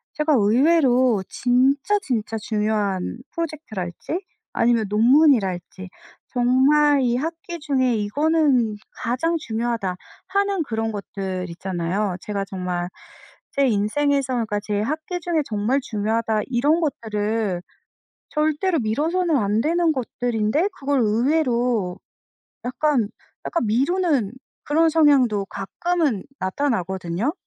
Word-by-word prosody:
제가 305 Hz, 0 st, +2 dB
의외로 250 Hz, -, +3 dB
진짜 270 Hz, +10 st, +2 dB
진짜 225 Hz, -, -2 dB
중요한 210 Hz, -2 st, -1 dB
프로젝트랄지 300 Hz, -, -4 dB, 0.3 s
아니면 230 Hz, -2 st, +2 dB
논문이랄지 210 Hz, -, +3 dB, 0.4 s
정말 275 Hz, +4 st, +4 dB
이 240 Hz, -2 st, +1 dB
학기 330 Hz, +5 st, -4 dB
중에 265 Hz, -5 st, +1 dB
'이거는 255 Hz, +1 st, +2 dB, 0.3 s
가장 260 Hz, +8 st, 0 dB
중요하다.' 225 Hz, -7 st, -2 dB, 0.3 s
하는 400 Hz, -2 st, +1 dB
그런 225 Hz, -4 st, -2 dB
것들 195 Hz, -3 st, -4 dB
있잖아요. 180 Hz, +2 st, -2 dB
제가 200 Hz, -2 st, -3 dB
정말 180 Hz, -2 st, -3 dB, 0.6 s
제 275 Hz, -1 st, +3 dB
인생에서 260 Hz, +5 st, +1 dB
그러니까 220 Hz, -4 st, -1 dB
제 205 Hz, -1 st, -2 dB
학기 315 Hz, -, -3 dB
중에 335 Hz, -2 st, 0 dB
'정말 220 Hz, +5 st, 0 dB
중요하다.' 220 Hz, 0 st, 0 dB
이런 280 Hz, +6 st, +2 dB
것들을 215 Hz, -, -1 dB, 0.7 s
절대로 315 Hz, +4 st, +1 dB
미뤄서는 315 Hz, +9 st, 0 dB
안 210 Hz, -1 st, +1 dB
되는 335 Hz, +3 st, +2 dB
것들인데 245 Hz, -, 0 dB
그걸 280 Hz, -1 st, +1 dB
의외로 235 Hz, -, +1 dB, 0.7 s
약간, 250 Hz, -2 st, +1 dB, 0.4 s
약간 335 Hz, -9 st, -1 dB
미루는 275 Hz, -, +1 dB, 0.3 s
그런 320 Hz, +2 st, +3 dB
성향도 270 Hz, -10 st, +3 dB
가끔은 275 Hz, -, -1 dB, 0.2 s
나타나거든요? 190 Hz, -, -1 dB
245 Hz, 265 characters per minute, -22 LUFS, 210-300 Hz, 0.7 s, 정말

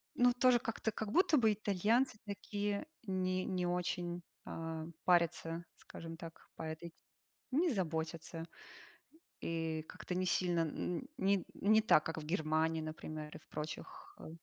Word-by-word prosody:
Ну, 245 Hz, 0 st, +6 dB
тоже 250 Hz, 0 st, +5 dB
как-то, 225 Hz, -1 st, -1 dB
как 210 Hz, 0 st, -3 dB
будто 335 Hz, -, +5 dB
бы 220 Hz, -4 st, +5 dB
итальянцы 215 Hz, +4 st, +2 dB
такие 205 Hz, +1 st, -2 dB, 0.2 s
не 185 Hz, -2 st, 0 dB
не 180 Hz, -1 st, 0 dB
очень, 175 Hz, 0 st, -1 dB, 0.2 s
а, 160 Hz, -1 st, -4 dB, 0.2 s
парятся, 170 Hz, -1 st, +2 dB
скажем 165 Hz, 0 st, -8 dB
так, 165 Hz, -1 st, -10 dB
по -, -, -6 dB
этой 160 Hz, +2 st, -5 dB
те 165 Hz, -, -27 dB, 0.6 s
не 345 Hz, +2 st, +4 dB
заботятся. 165 Hz, -2 st, -2 dB, 1.0 s
И 165 Hz, -1 st, -1 dB
как-то 180 Hz, -, -5 dB
не 185 Hz, -, +1 dB
сильно, 175 Hz, -2 st, +2 dB
н 165 Hz, +2 st, -1 dB
н -, -, -9 dB
не 195 Hz, -1 st, +2 dB
не 215 Hz, +2 st, +5 dB
так, 215 Hz, -8 st, +5 dB
как 165 Hz, -, -3 dB
в 155 Hz, -, -5 dB
Германии, 160 Hz, 0 st, +1 dB
например, 155 Hz, -1 st, -6 dB
и -, -, -7 dB
в -, -, -26 dB
прочих, 150 Hz, +1 st, -6 dB
а -, -, -8 dB
175 Hz, 155 wpm, -36 LUFS, 160-205 Hz, 1.0 s, Ну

